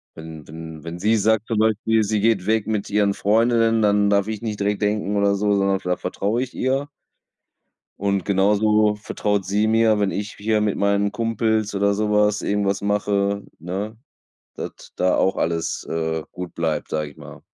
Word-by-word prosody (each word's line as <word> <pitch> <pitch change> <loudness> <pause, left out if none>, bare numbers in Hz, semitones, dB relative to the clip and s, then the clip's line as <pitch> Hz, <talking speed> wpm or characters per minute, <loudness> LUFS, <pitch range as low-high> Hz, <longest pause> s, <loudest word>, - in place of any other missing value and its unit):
Wenn 80 -2 -10
wenn 80 0 -9
wenn 85 +1 -7
sie 110 +4 +2
sagt 110 +1 +1
zum 115 - -1
Beispiel, 110 0 +2
sie 105 0 0
geht 110 -5 +2
weg 110 -1 +1
mit 105 -2 -2
ihren 100 -1 +2
Freundinnen 115 +2 +2
dann 105 -1 +3
darf 100 0 +2
ich 110 0 -4
nicht 105 -3 -4
direkt 105 +1 0
denken 105 0 0
oder 100 0 +3
so 105 +1 +1
sondern 100 -1 +1
da 90 0 0
vertraue 105 +6 -2
ich 130 - -5
ihr. 135 +2 -1 1.1
Und 100 -2 0
genauso 105 +2 +3
vertraut 105 -1 -2
sie 105 +3 +1
mir, 110 -1 +3
wenn 100 -1 +1
ich 105 +1 -4
hier 110 +1 0
mit 105 -1 0
meinen 100 0 +1
Kumpels 110 -2 0
oder 100 +1 +2
so 105 +1 -1
was, 105 0 +2
irgendwas 100 -1 0
mache, 100 0 0 0.2
ne, 100 +6 -5 0.6
dass - - -8
da 90 0 +2
auch 95 - +2
alles, 85 0 -2
äh, 80 -1 -2
gut 90 -1 -7
bleibt, 80 -2 -2
sage 75 -1 -2
ich - - -19
mal. - - -12
105 Hz, 180 wpm, -22 LUFS, 100-110 Hz, 1.1 s, dann